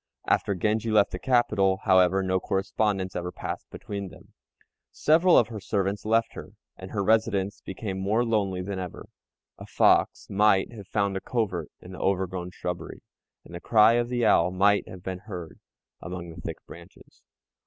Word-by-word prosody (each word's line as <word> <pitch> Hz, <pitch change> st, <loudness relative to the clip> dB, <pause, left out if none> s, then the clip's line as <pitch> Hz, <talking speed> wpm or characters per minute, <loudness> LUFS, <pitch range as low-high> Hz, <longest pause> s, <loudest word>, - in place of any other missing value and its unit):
After 100 Hz, -, +1 dB
Genji 110 Hz, +4 st, 0 dB
left 105 Hz, -2 st, +3 dB
the 90 Hz, -, -5 dB
capital, 100 Hz, -5 st, +2 dB
however, 95 Hz, -1 st, +4 dB
no 95 Hz, 0 st, +1 dB
correspondence 95 Hz, 0 st, -1 dB
ever 90 Hz, 0 st, -3 dB
passed -, -, -6 dB
between 100 Hz, -2 st, -6 dB
them. -, -, -17 dB, 0.6 s
Several 170 Hz, +4 st, +4 dB
of 115 Hz, -, +4 dB
her 110 Hz, -2 st, -6 dB
servants 100 Hz, +1 st, -2 dB
left 115 Hz, +1 st, +1 dB
her, -, -, -10 dB, 0.2 s
and 95 Hz, -, -10 dB
her 100 Hz, -1 st, -2 dB
residence 105 Hz, -2 st, +1 dB
became 95 Hz, -1 st, -5 dB
more 105 Hz, +5 st, +1 dB
lonely 100 Hz, -5 st, 0 dB
than 100 Hz, 0 st, -4 dB
ever. 90 Hz, -2 st, -7 dB, 0.5 s
A -, -, -10 dB
fox -, -, +3 dB
might 100 Hz, 0 st, +3 dB
have 100 Hz, -4 st, -10 dB
found 100 Hz, -2 st, 0 dB
a -, -, -5 dB
covert 95 Hz, -, -2 dB
in 90 Hz, -, -11 dB
the 95 Hz, -, -9 dB
overgrown 95 Hz, -2 st, -1 dB
shrubbery, 90 Hz, -1 st, -6 dB, 0.4 s
and -, -, -14 dB
the 85 Hz, -, -6 dB
cry 110 Hz, 0 st, +5 dB
of 120 Hz, 0 st, 0 dB
the 120 Hz, -2 st, 0 dB
owl 85 Hz, -5 st, +4 dB
might 100 Hz, +3 st, +2 dB
have 95 Hz, -1 st, -11 dB
been 95 Hz, -1 st, -5 dB
heard 90 Hz, -5 st, -9 dB, 0.4 s
among 90 Hz, -2 st, -7 dB
the 85 Hz, +1 st, -11 dB
thick 80 Hz, -1 st, -5 dB
branches. -, -, -15 dB
95 Hz, 175 wpm, -26 LUFS, 95-110 Hz, 0.6 s, cry